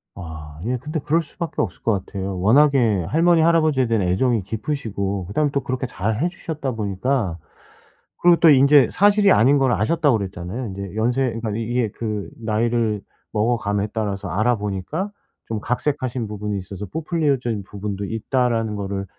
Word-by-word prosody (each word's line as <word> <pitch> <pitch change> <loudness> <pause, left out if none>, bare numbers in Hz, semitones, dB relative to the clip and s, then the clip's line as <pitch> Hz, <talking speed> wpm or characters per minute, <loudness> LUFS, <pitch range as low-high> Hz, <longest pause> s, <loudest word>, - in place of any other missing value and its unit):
아 80 -3 -9
예. 125 +2 0
근데 150 +6 -4
그럴 160 +4 +1
수밖에 165 +3 -4
없을 105 - -4
것 100 -5 0
같아요. 95 -2 -4
워낙에 115 - +4
할머니, 165 +1 +4
할아버지에 155 -6 +3
대한 115 -4 +1
애정이 115 +5 +2
깊으시고 100 -4 -3
그다음에 145 +9 0
또 140 -1 0
그렇게 130 0 -2
잘해 110 - -1
주셨다 155 -6 -4
보니까그리고 105 - -3 0.8
또 165 - +8
인제 140 0 +6
사실이 205 +1 +4
아닌 135 +2 +5
걸 135 -2 +3
아셨다고 140 - +2
그랬잖아요. 95 +4 -5
인제 100 0 -7
연세 120 +4 +1
그러니까 115 -2 -3
이 115 - -2
이게 120 0 0
그 105 -3 -4
나이를 110 -1 0 0.3
먹어 115 +3 +1
감에 100 -1 -1
따라서 100 -3 -2
알아 110 +7 +1
보니까 105 - -3 0.3
좀 110 -2 -3
각색하신 125 -1 -2
부분이 105 0 -4
있어서 100 +1 -7
부풀려진 140 - -1
부분도 100 0 -5
있다라는 115 0 0
거를 100 -1 -3
115 Hz, 385 characters per minute, -22 LUFS, 100-140 Hz, 0.8 s, 또